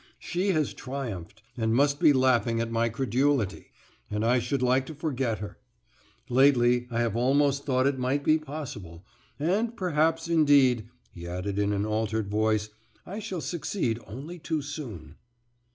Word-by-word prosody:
She 180 +3 -2
has 155 -7 +1
triumphed, 110 -7 -6
and 110 -1 0
must 140 +2 +3
be - - +6
laughing 125 -3 +2
at 115 0 -2
my 115 0 +1
credulity, 130 -2 0 0.4
and 105 +1 -1
I 125 +2 +3
should 125 +2 -1
like 130 +1 +2
to 160 - -7
forget 135 -7 -1
her. 100 0 -8 0.7
Lately 125 -2 +4
I 120 -1 -1
have 115 -2 0
almost 140 +3 +2
thought 130 -1 +2
it 140 -1 +1
might 130 +3 0
be 155 +2 +4
possible, 115 - -8 0.3
and 210 +9 0
perhaps, 165 -2 +1
indeed," 140 -8 +4 0.2
he 85 0 -9
added, 90 +3 -3
in 100 0 +1
an 100 0 0
altered 110 -1 -1
voice, 110 0 +1 0.4
"I 200 +4 -6
shall 195 -6 -4
succeed 155 - -2
only 140 - -8
too 155 -2 -2
soon." 110 - -8
130 Hz, 155 wpm, -27 LUFS, 110-145 Hz, 0.7 s, be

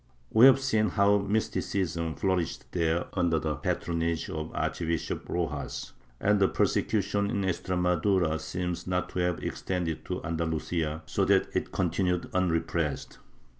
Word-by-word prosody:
We 115 +4 +8
have 135 0 +6
seen 110 -6 +2
how 100 0 +4
mysticism 95 -5 -1
flourished 95 -4 -1
there 85 -1 +1
under 85 -3 +2
the 80 -1 -1
patronage 85 +3 -1
of 80 -2 -4
Archbishop 85 -2 -2
Rojas, - - -3 0.3
and 105 0 +3
the 95 - +5
persecution 100 0 +1
in 105 -3 -1
Extremadura 90 -2 +1
seems 90 +2 -4
not 90 0 -1
to - - -4
have 90 -1 0
extended 90 -4 -2
to - - -4
Andalusia, 80 -1 -2
so - - 0
that - - +2
it - - -1
continued 90 -2 0
unrepressed. 85 -4 -1
90 Hz, 130 wpm, -28 LUFS, 80-100 Hz, 0.3 s, We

